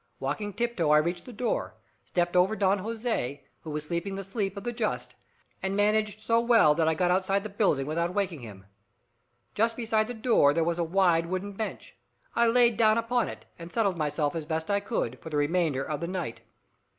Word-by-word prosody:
Walking 205 -1 -3
tiptoe 220 -7 -1
I 150 - +6
reached 170 +3 0
the 250 - -9
door, 240 +1 -2 0.3
stepped 175 0 -1
over 185 +4 +4
Don 200 -1 +2
Jose, 215 - -3 0.2
who 160 - -9
was 150 0 -3
sleeping 170 +4 -3
the 195 - -5
sleep 195 0 -3
of 200 - -6
the 240 0 -3
just, 225 -2 -2 0.5
and 190 +1 -1
managed 210 +1 +1
so 230 +1 +2
well 230 -10 +5
that 160 +1 +1
I 160 - +2
got 180 +2 +1
outside 195 +2 +1
the 215 - -5
building 195 -9 +1
without 170 +4 -1
waking 185 -5 -1
him. 100 -5 -11 0.9
Just 225 +2 +1
beside 220 -2 +1
the 245 - -5
door 220 - +3
there 165 - +2
was 170 +1 -1
a - - +2
wide 170 -1 +2
wooden 185 +3 -3
bench. 215 +2 -6 0.4
I 235 - +4
lay 240 0 +5
down 220 -1 +3
upon 230 +1 +1
it, - - -10
and 170 +1 -9
settled 200 -2 +1
myself, 150 -1 0
as 160 -2 -4
best 160 +3 -2
I 200 - +3
could, 200 - -3
for - - -9
the 150 - -2
remainder 150 -2 +1
of 150 -1 -3
the 170 - -3
night. 175 -10 -4
190 Hz, 210 wpm, -28 LUFS, 160-220 Hz, 0.9 s, I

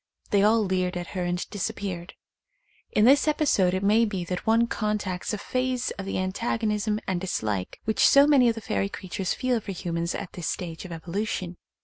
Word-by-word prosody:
They 200 - +4
all 215 +2 +4
leered 185 -1 0
at 175 -1 -5
her 180 -2 -2
and 175 0 -2
disappeared. 195 -4 -4 0.8
In 210 - +4
this 280 +4 +5
epi 305 0 +2
sode 185 -9 +3
it 190 - -2
may 215 +3 +4
be 200 -5 -1
that 180 +4 -4
one 225 +1 +4
contacts 210 -5 -2
a 210 - -2
phase 255 +3 -1
of 195 -1 -6
the - - -2
antagonism 210 +2 -1
and 180 -2 -1
dislike 105 - -2
which 220 - +3
so 280 0 +7
many 275 -5 +5
of 230 - 0
the 225 - -6
fairy 195 -1 -1
creatures 185 -1 -3
feel 255 -2 0
for 200 -2 -6
humans 170 -1 -2
at 185 - -6
this 175 - -5
stage 170 -1 -4
of 180 - -8
evolution. 180 +2 -3
200 Hz, 200 wpm, -26 LUFS, 180-225 Hz, 0.8 s, so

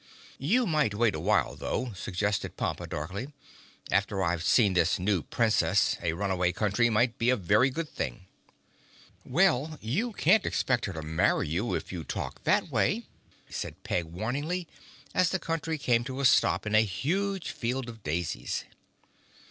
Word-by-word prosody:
"You 225 - +2
might 150 - +1
wait 110 -1 +2
a - - -3
while, - - +1
though," 125 -3 -3
suggested 100 +2 -2
Pompa - - -2
darkly. 100 - -5 0.6
"After 100 0 +1
I've 90 -1 0
seen 105 0 +4
this 90 +1 +3
new 95 -1 +1
Princess - - +2
a 80 - 0
Runaway 90 -1 0
Country 105 +4 +2
might 115 +2 +1
be 115 +1 +2
a 130 - +5
very 105 +5 +3
good 160 +5 -3
thing." 100 -8 -5 1.0
"Well, 155 -1 +2
you 180 - -1
can't 200 +4 +4
expect 125 -2 0
her 95 - -4
to 80 -1 -6
marry 80 -1 +1
you 95 +10 -1
if - - -5
you 90 -3 -5
talk - - -5
that - - +2
way," - - +1 0.5
said - - -6
Peg 90 - -1
warningly, 140 - -3 0.5
as 185 -2 +3
the 190 - 0
Country 165 -2 -2
came 120 -4 +2
to 130 0 -5
a 140 - +1
stop 125 - +4
in 105 - -2
a 110 - +7
huge 175 - -1
field 125 +1 -3
of 115 -2 -9
daisies. 80 -6 -2
115 Hz, 165 wpm, -29 LUFS, 95-145 Hz, 1.0 s, a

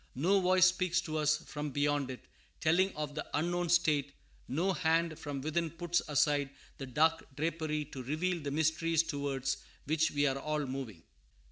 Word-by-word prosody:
No 180 +9 +3
voice 185 0 +5
speaks 185 -1 +2
to 155 -3 -3
us 150 0 +3
from 150 0 -5
beyond 145 -1 0
it, 130 - -6 0.4
telling 180 +4 +3
of 150 -1 -4
the 155 - -3
unknown 175 +3 0
state; 150 -5 +2 0.3
no 170 +9 0
hand 165 -2 +1
from 145 -2 -5
within 160 +3 -1
puts 175 +1 -1
aside 145 -1 +2 0.3
the 135 - -5
dark 160 +5 +2
drapery 155 0 -1
to 135 -2 -8
reveal 160 +7 -1
the 145 - -3
mysteries 160 +2 +2
towards 140 -3 -2 0.3
which 160 +2 +2
we 145 0 +1
are 135 -1 +1
all 150 0 -1
moving. 130 -10 -6
155 Hz, 165 wpm, -32 LUFS, 145-170 Hz, 0.4 s, voice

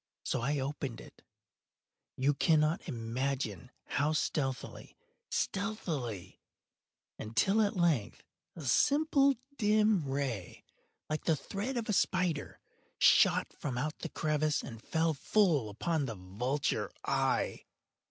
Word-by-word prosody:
So - - -1
I 140 +5 0
opened 135 -3 -3
it—you 140 +3 -7
cannot 155 +3 +2
imagine 120 - -3 0.2
how 145 +3 0
stealthily, 135 -4 -2 0.3
stealthily—until, 150 - -3
at 205 -1 +1
length 165 - +1 0.3
a 165 - -8
simple 280 - +4 0.2
dim 210 - +3
ray, 135 -9 -3 0.4
like 155 0 -3
the 160 - +3
thread 205 - -4
of 235 - -1
the 215 - -1
spider, 180 -6 0 0.4
shot - - +5
from 130 -4 -4
out 150 +5 -2
the 165 - -5
crevice 155 -1 0
and 115 -4 -8
fell 160 +3 +1
full 155 - +2
upon 150 - -1
the 115 - -4
vulture 115 +10 -2
eye. - - 0
150 Hz, 110 wpm, -32 LUFS, 125-180 Hz, 0.4 s, shot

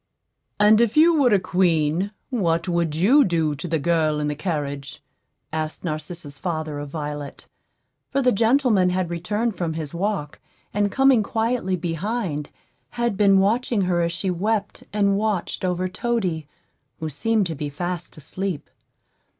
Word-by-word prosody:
"And 210 +2 +6
if 235 +3 +1
you 335 +2 +7
were 280 -6 +4
a 205 - +5
queen, 180 0 +1 0.2
what 170 -8 0
would 170 -3 0
you 235 - +5
do 165 - +1
to 145 +5 -6
the 165 -1 +1
girl 155 -1 +1
in 150 0 -1
the 150 - -2
carriage?" 145 -4 -4 0.5
asked 155 0 -3
Narcissa's 155 -3 -5
father 155 -4 -3
of 145 0 -6
Violet; 145 -1 -6 0.6
for 275 - 0
the 250 - +4
gentleman 225 -4 +3
had 180 -1 -1
returned 210 +6 -1
from 165 -3 -2
his 155 -2 -5
walk, 180 -4 -2 0.3
and 205 0 +1
coming 270 -2 +5
quietly 220 -2 0
behind, 170 -2 -3 0.4
had 235 -3 -1
been 195 -1 +5
watching 215 +3 +2
her 180 -2 +1
as 170 0 0
she 180 +3 -1
wept 205 +3 -1
and 200 -1 +2
watched 210 -4 -1
over 180 0 0
Toady, 185 -7 -2 0.5
who 160 - -3
seemed 210 +8 +1
to 165 - -3
be 145 -1 -4
fast 175 +3 -5
asleep. 185 +2 -4
180 Hz, 155 wpm, -23 LUFS, 160-210 Hz, 0.6 s, you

